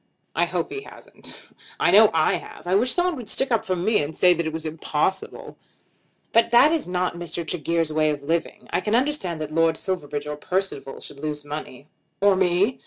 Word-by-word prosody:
"I - - +3
hope - - -3
he 410 - -4
hasn't. - - -12 0.3
I - - +3
know 210 +1 +8
I 160 -1 +2
have. - - -12
I 180 - -1
wish 230 +6 +3
someone 355 -1 +1
would 235 -5 -8
stick 265 +3 0
up 230 - +1
for 185 - +1
me, 210 +3 +1
and 150 +2 -4
say 180 -1 +6
that 170 -1 -2
it - - -2
was 160 0 -6
impossible." 155 +3 -3 0.8
"But 230 - +4
that 240 +6 +6
is 325 - -1
not 180 0 -1
Mr. 170 -1 -5
Tregear's 165 0 -1
way 155 0 +2
of 145 -2 -3
living. 165 +3 -2
I - - +1
can 210 +4 0
understand 245 - 0
that 155 0 -5
Lord 165 0 +2
Silverbridge 150 -6 -3
or 150 0 -5
Percival 180 -5 -3
should 140 - -11
lose 150 0 -4
money." 145 -2 -7 0.3
"Or 200 -1 +4
me?" 190 +5 +2
175 Hz, 205 wpm, -24 LUFS, 155-205 Hz, 0.8 s, know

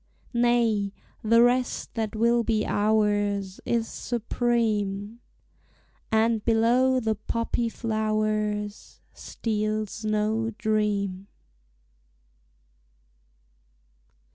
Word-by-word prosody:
Nay, 235 -4 +2 0.3
the 230 +2 +5
rest 250 +1 +1
that 220 -2 -3
will 235 +2 +3
be 220 -2 0
ours 205 -2 +1
Is 230 -1 +1
supreme, 225 -3 -1 0.9
And 220 0 +2
below 245 +3 +3
the 220 -2 0
poppy 230 +2 -2
flowers 215 -2 -2
Steals 215 -1 -3
no 215 +1 0
dream. 205 -3 -1
220 Hz, 70 wpm, -26 LUFS, 210-230 Hz, 0.9 s, the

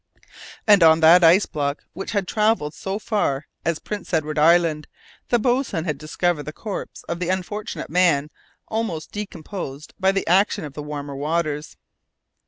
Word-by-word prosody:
And 205 -3 +6
on 160 -1 +7
that 170 +3 +7
ice 175 +5 +6
block, 145 -1 -3
which 195 +5 -6
had 200 -3 0
travelled 210 -9 +1
so 190 +5 -4
far 200 -11 -1 0.2
as 165 -1 0
Prince 210 +2 -7
Edward 155 -1 -1
Island, 165 -1 +3 0.4
the 240 - +4
boatswain 240 - 0
had 150 -5 -2
discovered 160 +1 -1
the 150 +1 -6
corpse 205 +5 -7
of 170 - -5
the 180 -1 -2
unfortunate 190 +1 -4
man 160 -5 +2 0.4
almost 220 -8 -3
decomposed 170 -7 -7
by 190 0 +3
the 195 0 -1
action 185 -1 +2
of 145 - -9
the 150 - -6
warmer 145 -1 -6
waters. 150 +1 -2
170 Hz, 160 wpm, -22 LUFS, 150-195 Hz, 0.4 s, on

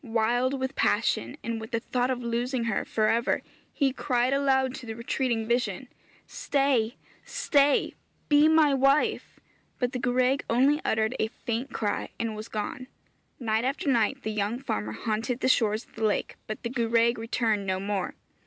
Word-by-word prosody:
Wild 245 +3 +1
with 260 +1 -2
passion, 285 - +1
and 230 -1 -3
with 220 - -7
the 230 -3 -1
thought 245 +2 -1
of 250 -1 -2
losing 240 +2 -1
her 230 -4 -1
for 215 -1 +1
ever, 230 +2 +1 0.3
he 275 -3 +1
cried 250 -1 +1
aloud 265 -2 +2
to 260 -2 -8
the 225 - -5
retreating 235 -1 -1
vision, 240 -1 -1 0.4
'Stay! 270 -5 0 0.3
stay! 290 - +2 0.3
Be 295 +1 +6
my 315 -2 +5
wife.' 275 +2 +2 0.4
But 245 -1 0
the 255 - -3
gwraig 255 +2 +1
only 275 +6 +3
uttered 220 +3 0
a 220 - +2
faint 235 +4 -4
cry, 205 -1 -2
and 230 -1 -2
was 215 +1 -7
gone. 220 +4 -4 0.5
Night 220 -2 0
after 280 +6 -2
night 255 +3 +1
the 220 - -2
young 210 +2 -1
farmer 105 - -3
haunted 225 - -2
the - - +2
shores 220 -3 +2
of - - -28
the 220 - -5
lake, 215 -1 0
but 215 - -6
the 235 - -2
gwraig 235 -1 +2
returned 225 -3 0
no 185 0 0
more. 195 -1 -2
240 Hz, 170 wpm, -27 LUFS, 220-265 Hz, 0.5 s, Be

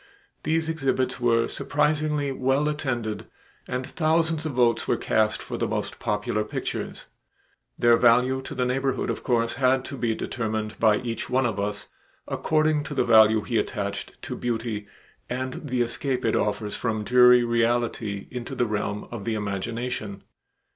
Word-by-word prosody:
These 160 0 0
exhibits 135 -5 0
were 115 -1 +3
surprisingly 150 -1 0
well 135 +3 +1
attended 125 -8 -2 0.4
and 125 +1 -3
thousands 160 0 +1
of 150 - -4
votes 120 -2 +2
were - - +2
cast 110 -1 +1
for - - -5
the - - 0
most - - -3
popular 105 0 -1
pictures. 105 - -5 0.7
Their 120 0 +5
value 125 +3 +4
to 135 - -8
the 125 -1 0
neighborhood 135 +1 0
of - - -5
course 115 -1 0
had 130 0 +3
to 140 - -6
be 115 -3 0
determined 110 -3 -3
by 110 -2 +4
each 115 -2 -4
one 130 +1 +2
of 110 -4 -1
us 100 0 -2 0.4
according 155 -1 +1
to 145 - -6
the - - +2
value 110 -1 +6
he 110 +2 0
attached 100 -1 -4
to - - -4
beauty 115 -3 -3 0.4
and 130 +4 -4
the 125 -1 +2
escape 125 +2 -2
it 115 - +2
offers 105 0 -1
from 110 -3 -2
dreary 125 +1 +6
reality 115 -3 0
into 125 -2 -5
the 120 - +1
realm 105 -1 -3
of 115 -4 -6
the 115 -1 -1
imagination. 105 +1 -4
120 Hz, 160 wpm, -25 LUFS, 110-130 Hz, 0.7 s, value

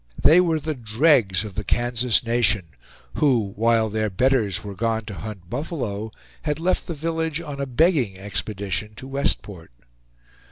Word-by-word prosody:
They 165 +4 +6
were 165 -3 +1
the 155 +1 -3
dregs 115 - +2
of 105 -2 -7
the 105 - -3
Kansas 120 +1 +1
nation, 110 -7 +1 0.5
who, 115 -9 +2
while 115 0 +3
their 110 0 -1
betters 105 -2 +1
were 100 -1 -6
gone 110 +1 -1
to 105 - -7
hunt 100 -3 -8
buffalo, 120 - -4 0.3
had 150 0 -2
left 180 +3 0
the 170 - -4
village 160 0 -2
on 145 -4 -6
a 140 - -2
begging 130 - +2
expedition 100 +1 -3
to 130 - -9
Westport. 105 - -1
115 Hz, 155 wpm, -23 LUFS, 105-145 Hz, 0.5 s, They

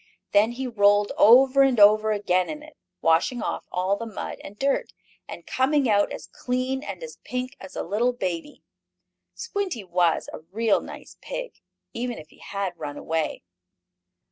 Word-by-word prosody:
Then 210 +3 +4
he 260 +2 -4
rolled 205 -3 +3
over 260 +4 +6
and 265 -4 +4
over 215 +1 +6
again 185 -3 +1
in 300 -1 -6
it, 310 0 -15 0.3
washing 165 +9 +2
off - - -3
all 185 +2 +1
the 230 +3 -6
mud 215 - -6
and 205 - -10
dirt, 275 +3 0 0.3
and - - -9
coming 275 +1 +2
out 205 -2 +3
as - - -7
clean 255 +1 -2
and 300 - -7
as 475 - -8
pink 255 0 -4
as 190 - -11
a - - -2
little 220 +7 +1
baby. 185 - -5 0.7
Squinty 400 - -3
was 175 -2 +1
a - - -6
real 205 +7 0
nice - - -11
pig, - - -5 0.4
even 240 0 -3
if 155 0 -11
he - - -21
had 195 -4 -4
run 145 -2 -5
away. 160 - -2
220 Hz, 170 wpm, -25 LUFS, 190-260 Hz, 0.7 s, over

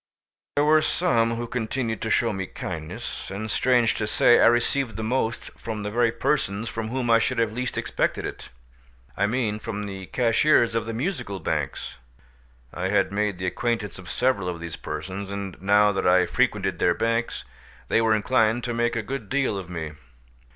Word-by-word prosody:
There 145 - +3
were 155 +1 +5
some 115 -9 +1
who 120 +1 -3
continued 115 -1 -2
to 110 - -2
show 115 0 +2
me 95 -1 -3
kindness, 80 -4 -6
and 105 +3 -4
strange 120 -2 +3
to 105 - -2
say, 120 +2 +5
I - - +7
received 120 0 +1
the 110 - -4
most 115 0 -1
from 110 -2 -5
the 105 - -3
very 120 +1 +3
persons 100 0 -1
from 115 -1 -4
whom 120 0 -1
I 115 - +6
should 115 - 0
have 115 -2 +1
least 125 +2 -3
expected - - -1
it—I - - -7
mean 110 -2 -1
from 105 -1 -4
the 95 -2 -7
cashiers 120 0 +3
of 115 -1 -1
the 115 - -3
Musical 120 - -3
Banks. - - -3 0.8
I 95 +1 -2
had 105 -1 +2
made 105 -1 0
the 90 - -4
acquaintance 110 +1 -2
of 90 -1 -10
several 125 -8 +1
of 85 -1 -5
these 85 -1 -6
persons, 95 +1 -5
and 100 -2 -5
now 105 +1 +5
that 95 -2 0
I 90 0 +5
frequented 100 -8 0
their 90 - +3
bank, 115 +1 0 0.6
they 115 - +3
were 110 -1 +4
inclined 115 +1 +2
to 120 - -2
make 120 0 0
a 115 - -1
good 125 -3 -5
deal 135 -6 +1
of 95 -2 -6
me. 80 -3 -4
110 Hz, 185 wpm, -25 LUFS, 95-120 Hz, 0.8 s, I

